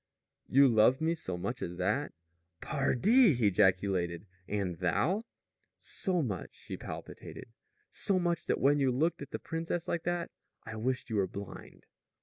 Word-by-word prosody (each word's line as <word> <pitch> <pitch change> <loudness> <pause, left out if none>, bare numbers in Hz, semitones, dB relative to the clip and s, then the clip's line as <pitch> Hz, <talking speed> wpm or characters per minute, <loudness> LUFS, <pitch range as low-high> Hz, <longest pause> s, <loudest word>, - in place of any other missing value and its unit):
"You 140 +1 +6
love 115 +2 +5
me 160 +1 +1
so 95 - -5
much 100 +8 -4
as 90 0 -4
that?" 105 +11 0 0.5
"Pardi!" 180 - +4
he 115 -4 +3
ejaculated. 90 -2 +1 0.2
"And 100 -4 -2
thou?" 100 - +1 0.6
"So 180 -4 -1
much," 100 -8 -4
she - - -7
palpitated, - - -8 0.4
"so 195 - 0
much 175 -2 -1
that - - +1
when 145 +2 +4
you 135 -2 +3
looked 155 +7 0
at 140 - -7
the - - -4
princess 165 +1 -3
like 170 - -1
that 175 -1 -1 0.3
I 110 - -7
wished 125 +2 -2
you 110 - 0
were 95 -2 +2
blind!" 100 +2 -9
125 Hz, 155 wpm, -31 LUFS, 100-165 Hz, 0.6 s, You